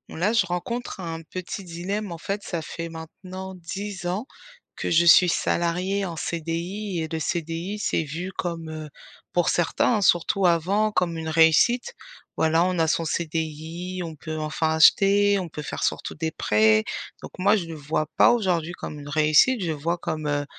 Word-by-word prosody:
Là, 190 +7 +1
je 215 -5 +3
rencontre 195 +4 -4
un 165 -1 -5
petit 185 +4 -6
dilemme, 185 +4 -4
en 170 - -5
fait, 200 +5 -4
ça 170 -4 -3
fait 165 +1 -6
maintenant 185 +4 -8
10 190 +1 -6
ans 190 +7 -2 0.5
que - - -3
je 170 +1 +4
suis 175 +1 +7
salariée 180 +4 0
en 170 -3 -5
CDI. 170 +4 -3
Et - - -3
le 160 - -2
CDI 170 +4 -3
c'est 165 - 0
vu 165 +5 -5
comme, 165 -2 -4
heu, 155 -1 -7 0.4
pour 175 -2 +2
certains, 175 +7 +2
hein, - - -1
surtout 185 +1 +3
avant, 190 +6 +2
comme 175 -4 0
une 160 0 -4
réussite. 165 - +4 0.4
Voilà, 160 +1 +3
on 180 -1 0
a 160 - +3
son 165 - +1
CDI, 165 +2 -3
on 165 -2 -6
peut 155 +1 -6
enfin 155 +1 -1
acheter, 200 +5 +5
on 180 -3 -5
peut 150 - -7
faire - - -5
surtout - - -2
des 160 0 -2
prêts, 110 -5 +3 0.4
donc - - -9
moi 200 +4 +4
je 180 - -3
le 165 - -7
vois 155 +1 -2
pas - - +6
aujourd'hui 180 -8 0
comme 155 -3 -7
une 145 0 -9
réussite, 155 - +4
je 180 - -2
le 160 - 0
vois 165 +4 -2
comme, 155 -2 -4
heu 145 0 0
170 Hz, 185 wpm, -24 LUFS, 160-190 Hz, 0.5 s, suis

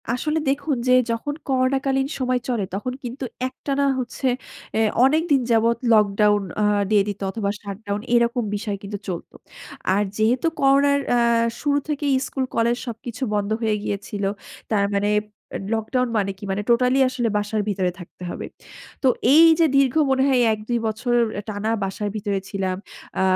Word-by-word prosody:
আসলে 300 +6 0
দেখুন 280 0 0
যে, - - +4 0.2
যখন 230 +6 -2
করোনা 260 0 +2
কালীন 270 0 +1
সময় 255 -1 +1
চলে, 235 -5 0
তখন 230 +6 -3
কিন্তু 250 +3 -6 0.2
একটানা 275 +2 -2
হচ্ছে 255 +2 -3 0.5
অ্যা 220 - +1 0.2
অনেক 305 +4 +3
দিন 275 -2 +5
যাবৎ 230 0 +3 0.2
লকডাউন 210 -1 +3 0.2
আ - - +3 0.3
দিয়ে 210 -2 +4
দিত 205 -1 -4
অথবা 205 -1 -2
শাটডাউন, 205 0 -5
এরকম 235 +1 +2
বিষয় 205 -1 -3
কিন্তু 200 +1 -5
চলত। 175 -3 -5 0.6
আর 205 - +2
যেহেতু 235 +8 +2
করোনার 280 +1 +4
অ্যা 245 - +3 0.4
শুরু 290 -1 +2
থেকেই 290 -2 0
স্কুল 265 -1 -2
কলেজ 235 +1 +2
সবকিছু 235 +2 -6
বন্ধ 205 0 -1
হয়ে 220 -2 +1
গিয়েছিল। 200 0 -4 0.5
তার 200 -2 +3
মানে, 200 +1 +1 0.5
এ - - -8
লকডাউন 250 +3 0
মানে 200 -2 0
কি? 200 - -15
মানে 195 +2 -1
টোটালি 250 +2 +3
আসলে 250 -2 -1
বাসার 210 +1 -1
ভিতরে 185 -3 0
থাকতে 175 0 -11
হবে। - - -5 0.6
তো - - +4 0.3
এই 320 +2 +8
যে 330 - +6
দীর্ঘ 275 -2 +4 0.2
মনে 265 0 +3
হয়, 255 -2 +3
১-২ 220 +3 -2
বছর 240 +3 -1 0.3
টানা 210 +1 -2
বাসার 195 +2 -3
ভিতরে 200 -2 -1
ছিলাম। 190 -2 -2 0.4
আ - - +2
235 Hz, 165 wpm, -22 LUFS, 205-265 Hz, 0.6 s, এই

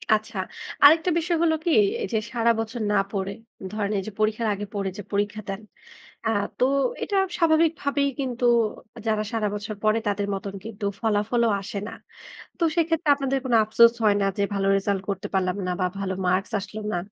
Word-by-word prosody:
আচ্ছা। 215 -1 -5 0.5
আরেকটা 320 +5 +7
বিষয় 340 0 0
হলো 320 -1 +3
কি? 340 - +2 0.3
এইযে 235 - -1 0.2
সারা 235 -1 +3
বছর 225 +1 -4
না - - +2 0.2
পড়ে। 195 -1 -2 0.4
ধরেন 210 -1 -2
এইযে 210 +3 -6
পরীক্ষার 215 +1 +1
আগে 205 +1 -5
পড়ে 200 -2 -1
যে - - -5
পরীক্ষা 205 +1 -1
দেন। 195 +2 -4 0.6
অ্যা 225 - +1 0.3
তো - - +4 0.4
এটা 405 - -1 0.2
স্বাভাবিকভাবেই 315 -4 +2
কিন্তু 250 -2 -3 0.6
যারা 215 -1 +1
সারা 220 -2 0
বছর 210 +1 -5
পড়ে 215 +1 +3
তাদের 205 0 -1
মতন 195 0 -5
কিন্তু 215 -2 -7 0.2
ফলাফলও 225 +2 +1
আসে 200 +1 -5
না। - - -8 0.7
তো - - -5
সেক্ষেত্রে 330 -1 +1
আপনাদের 275 -1 -1
কোন 250 -2 0
আফসোস 230 +2 +6
হয় 210 -1 +5
না - - +2
যে, 200 - +2
ভালো 195 -1 0
রেজাল্ট 195 -1 -1
করতে 195 -2 -3
পারলাম 185 0 +1
না - - -1
বা 180 - +2
ভালো 190 -1 -2
মার্কস 185 +5 +1
আসলো 210 +2 -7
না? - - 0
215 Hz, 180 wpm, -25 LUFS, 200-255 Hz, 0.7 s, আরেকটা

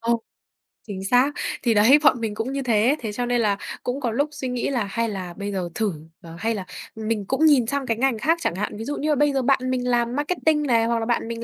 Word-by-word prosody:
Ờ. 230 +1 +1 0.8
Chính 190 -2 -6
xác. 250 +6 +3 0.3
Thì 235 -2 +3
đấy, 230 +8 +6
bọn 255 -5 +5
mình 215 -2 -2
cũng 235 +5 -3
như 275 - -2
thế. 240 +3 +2
Thế 220 -3 -4
cho 245 +4 -2
nên 245 -1 +1
là 205 -2 +1 0.3
cũng 250 +3 -2
có 235 -3 -1
lúc 285 +6 0
suy 265 -3 -5
nghĩ 250 +1 -2
là 245 -6 0
hay 230 +3 -2
là 185 -4 -5
bây 200 +2 -5
giờ 180 -3 -3
thử, 215 -5 0 0.3
ờ, 165 -1 -11
hay 225 +2 0
là 190 -2 -5 0.3
mình 220 -2 -2
cũng 270 +9 +1
nhìn 265 -7 +5
sang 280 +1 -1
cái 230 -2 -1
ngành 260 -2 +1
khác 325 +7 +2
chẳng 170 - -1
hạn, 210 +1 -3
ví 225 - -6
dụ 290 - -3
như 305 - -2
là 300 - +3
bây 290 0 +2
giờ 270 - +1
bạn 265 +1 +3
mình 250 -1 -1
làm 240 0 +1
marketing 300 0 +1
này, 230 -4 +2
hoặc 230 0 +1
là 225 - -2
bạn 235 -1 0
mình 230 0 -5
235 Hz, 275 wpm, -23 LUFS, 215-270 Hz, 0.8 s, đấy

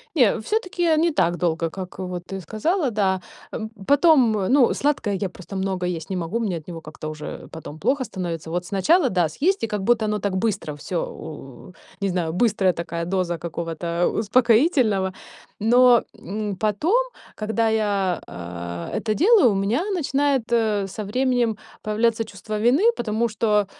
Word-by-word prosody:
Не, 245 -9 +4
всё-таки, 365 - -2
э, 325 -2 +4
не 335 +2 +3
так 175 - +2
долго, 165 -2 0
как 185 +1 -8
вот 180 -2 -5
ты 195 0 -5
сказала, 275 - 0
да. 195 -4 +1 0.3
М, 220 - -4 0.2
потом, 285 -5 +5 0.2
ну, 265 -2 +4
сладкое 280 -8 0
я 195 0 -1
просто 185 +2 -10
много 190 -1 -1
есть 170 -2 -4
не 190 - -1
могу, 175 +5 -2
мне 210 -7 -1
от 160 0 -9
него 170 -2 -6
как-то 155 0 -8
уже 155 -1 -7
потом 155 -1 -8
плохо 260 - +1
становится. 170 -6 -5
Вот 175 +2 -2
сначала 260 - +3
да, 180 -5 +2
съесть, 345 - 0
и - - +1
как 210 -2 -3
будто 230 +2 +2
оно 210 0 0
так 200 -1 -2
быстро 190 -7 -1
всё 165 +4 -3
у 150 +2 -10 0.3
не 200 - 0
знаю, 175 -3 -1
быстрая 195 -1 +2
такая 170 0 -4
доза 175 -1 -1
какого-то 170 +1 -2
успокоительного. 225 - +3 0.5
Но, 240 +2 +6 0.2
м, 205 +1 -4
потом, 215 - +1 0.4
когда 220 +1 0
я, 205 -4 0
э, 85 0 -6
это 215 -2 -1
делаю, 370 - +5
у - - -1
меня 205 - 0
начинает, 280 -5 +1
э, 215 -4 +2
со 210 +3 -6
временем 245 0 +1 0.3
появляться 225 +1 +1
чувство 215 0 -6
вины. 265 - +4
Потому 230 +1 0
что, 210 -2 +1
205 Hz, 170 wpm, -23 LUFS, 180-240 Hz, 0.5 s, Но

